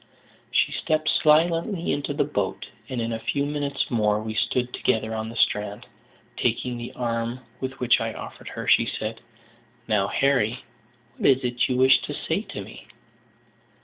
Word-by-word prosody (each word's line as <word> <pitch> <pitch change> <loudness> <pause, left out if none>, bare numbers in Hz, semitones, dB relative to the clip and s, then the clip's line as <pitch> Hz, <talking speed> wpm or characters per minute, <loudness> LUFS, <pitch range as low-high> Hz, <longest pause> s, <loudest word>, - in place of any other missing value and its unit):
She - - +2
stepped 155 0 -1
silently 165 +4 +3
into 145 0 -1
the - - +2
boat, 105 -10 -2 0.2
and 130 - -3
in 115 0 -1
a 115 - -3
few 140 +5 -1
minutes 145 -1 -2
more 105 -3 +2
we 110 0 -4
stood 125 +3 0
together 110 0 0
on 110 0 -3
the 115 - -9
strand. 105 -2 +1 0.5
Taking 125 -1 0
the 120 0 -6
arm 115 0 -2 0.2
which 130 -3 +1
I 115 0 -1
offered - - -9
her, - - -6
she 115 - +5
said: 110 0 -4 0.7
"Now, 105 -3 +2
Harry, 125 -1 +1 0.5
what - - +3
is 130 0 +4
it 120 0 0
you 125 - +1
wish 130 +1 +6
to - - -5
say - - -1
to - - -7
me?" - - -12
120 Hz, 165 wpm, -25 LUFS, 110-140 Hz, 0.7 s, wish